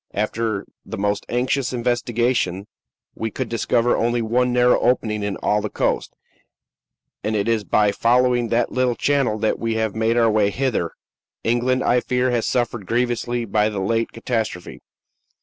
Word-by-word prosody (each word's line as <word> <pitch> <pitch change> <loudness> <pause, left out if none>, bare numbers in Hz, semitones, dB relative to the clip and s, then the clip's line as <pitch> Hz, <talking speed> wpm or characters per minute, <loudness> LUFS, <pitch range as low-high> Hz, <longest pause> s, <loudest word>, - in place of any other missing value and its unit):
After 110 0 -1 0.2
the 110 - -7
most 100 +1 -1
anxious 125 +2 0
investigation, 120 -5 0 0.5
we 110 - -3
could 125 +2 -4
discover 115 +1 +1
only 120 +1 +1
one 125 +3 +1
narrow 125 0 +4
opening 110 -4 +1
in 100 -1 -2
all 105 0 +2
the 105 - -3
coast, - - -1 1.1
and 110 +1 -1
it 100 0 0
is 115 -2 +1
by 105 +1 +2
following 120 +2 +2
that 115 +1 0
little 125 -1 +1
channel 140 -6 +1
that 110 0 0
we 115 -1 -1
have 110 -2 -1
made 110 +1 +1
our 115 -2 +4
way 105 -1 +3
hither. 120 -7 -1 0.5
England, 125 +2 +1
I 125 - +3
fear, 125 +1 0
has 120 -2 0
suffered 120 -5 -1
grievously 120 0 -1
by 105 0 +1
the 105 -2 -4
late 115 +4 0
catastrophe. 110 -6 -4
115 Hz, 160 wpm, -21 LUFS, 105-125 Hz, 1.1 s, narrow